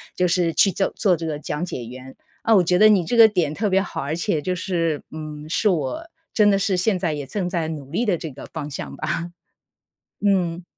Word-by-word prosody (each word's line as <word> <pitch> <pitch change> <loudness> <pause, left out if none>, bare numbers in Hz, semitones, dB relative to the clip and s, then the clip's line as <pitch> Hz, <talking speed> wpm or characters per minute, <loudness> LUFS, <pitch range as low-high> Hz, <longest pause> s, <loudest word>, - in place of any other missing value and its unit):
就 180 - +2
是 170 -2 +1
去 195 - +5
做 195 +2 -1
做 190 -4 +3
这 165 0 -6
个 150 -2 -2
讲 150 +2 -4
解 125 -9 -6
员。 130 +2 -10 0.3
啊， 225 -1 +4
我 185 - +5
觉 180 +2 +2
得 215 - +8
你 195 -5 +4
这 240 - -1
个 230 -1 +9
点 175 -8 0
特 205 +6 -1
别 190 0 +3
好， - - -5
而 145 +3 -2
且 170 -3 -1
就 180 +4 -2
是， 165 -4 -1
嗯， 155 -1 -7
是 210 +6 +1
我 185 - -2 0.2
真 210 -2 +5
的 195 - +4
是 195 0 +1
现 185 +2 +1
在 170 -4 -1
也 145 -2 -5
正 185 +4 -2
在 170 -3 -2
努 145 -3 -7
力 225 - 0
的 200 -7 +1
这 155 -2 -6
个 135 - -10
方 145 - -6
向 - - -6
吧。 165 +3 -3 0.9
嗯。 180 -4 +1
175 Hz, 250 characters per minute, -22 LUFS, 155-195 Hz, 0.9 s, 个